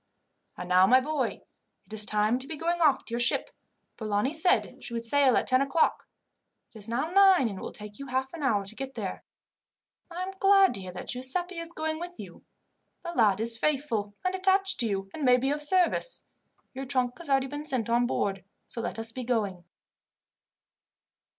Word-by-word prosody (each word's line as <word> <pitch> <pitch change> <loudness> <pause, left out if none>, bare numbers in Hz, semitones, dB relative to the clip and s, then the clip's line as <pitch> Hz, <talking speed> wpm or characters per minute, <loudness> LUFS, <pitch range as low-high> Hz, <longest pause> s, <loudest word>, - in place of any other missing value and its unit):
"And 180 - -6
now, 185 +1 +5
my 255 +4 +6
boy, 300 +3 -3 0.4
it - - -12
is 215 -1 +3
time 215 +3 +1
to 265 - -4
be 320 - -5
going 340 +3 -2
off 290 -4 +3
to - - -10
your 235 - -1
ship. 240 +1 +2 0.5
Polani 215 +4 -1
said 355 +4 +2
she 235 - -6
would 230 - -3
sail 265 +2 +3
at - - +1
ten 255 0 +3
o'clock. 275 +4 +1 0.7
It 220 - -11
is 210 +2 -4
now 260 +8 -2
nine, 380 -7 +5
and 195 -4 -6
it - - -10
will - - -6
take 210 +1 -10
you 275 - -7
half 260 +1 -2
an 335 - -7
hour 205 -8 +1
to 195 - -9
get 270 +1 -7
there. - - -5 0.9
I 355 +1 -5
am 380 +1 -6
glad 390 -1 +5
to 195 - -4
hear 185 -1 -8
that 180 - -9
Giuseppi 335 +8 0
is 335 0 -5
going 315 -1 -3
with 350 +1 -8
you. - - -11 0.6
The 345 - -5
lad 210 - +3
is 230 +1 -1
faithful 260 -9 -1
and 370 - +1
attached 385 +1 +3
to 235 - +2
you, 195 -2 -3
and 310 - -6
may 250 -1 +5
be 265 +2 0
of 295 +1 -2
service. 365 +9 0 0.5
Your 270 +1 -6
trunk 255 -1 0
has 335 -4 -7
already 270 -1 +2
been 290 +2 -6
sent 255 -7 -1
on 240 +1 +2
board, 195 -5 -2 0.2
so 235 - -5
let 235 - -4
us 225 0 +1
be 255 +2 -6
going." 205 -8 -2
260 Hz, 210 wpm, -27 LUFS, 225-320 Hz, 0.9 s, my